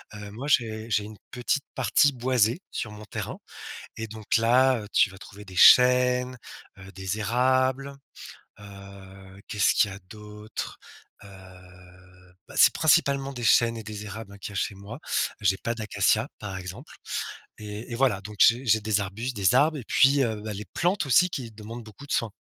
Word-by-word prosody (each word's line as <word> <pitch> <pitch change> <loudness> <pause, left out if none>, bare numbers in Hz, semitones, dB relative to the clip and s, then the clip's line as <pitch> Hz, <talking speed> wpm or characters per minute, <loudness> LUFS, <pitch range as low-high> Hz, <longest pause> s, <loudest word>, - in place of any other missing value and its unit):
Heu, 105 -1 -9
moi, 125 +7 -7
j'ai 110 -3 0
j'ai 105 -2 +1
une 105 0 -11
petite 125 +3 -1
partie 130 +3 +3
boisée 125 - +1
sur 105 - -4
mon 105 0 -11
terrain - - -6 0.6
et 115 - -4
donc 110 +1 -1
là, 125 +2 +3
heu, 105 - -9
tu 100 - +4
vas 95 - -13
trouver 105 0 -12
des 95 -1 -12
chênes, 125 +3 +6 0.4
heu, 95 0 -12
des 95 +3 -4
érables, 130 +4 +1 0.7
heu, 100 -1 -13
qu'est-ce 105 -2 +2
qu'il 105 - +3
y - - -7
a - - -9
d'autres? 105 0 -8 0.5
Heu, - - -12 1.2
bah, - - -13
c'est - - +7
principalement 140 -4 +2
des 120 -3 -6
chênes 115 +1 +4
et - - -7
des 105 0 -7
érables, 105 0 -8
hein, - - -11
qu'il 100 - -7
y - - -11
a - - -5
chez 100 - -1
moi. 100 +5 -10 0.4
J'ai 95 -1 +2
pas 115 - -3
d'acacias, 110 +2 0
par 95 -3 -6
exemple 90 +1 -9 0.7
et 105 +3 -8
et - - -2
voilà, 125 -7 +2
donc 105 +1 -9
j'ai 120 +3 +5
j'ai 110 -1 +4
des 110 -1 0
arbustes, 110 +6 -4
des 95 -3 +2
arbres 155 +2 +4
et 125 - -8
puis, 140 +1 +4
heu, 110 -2 -3
bah, 110 0 -5
les 105 +2 -6
plantes, 175 -2 0
aussi, 180 +8 +4
qui 125 -8 -5
demandent 110 +2 -9
beaucoup 110 +7 -13
de - - -4
soin. 115 -3 0
110 Hz, 190 wpm, -26 LUFS, 105-125 Hz, 1.2 s, c'est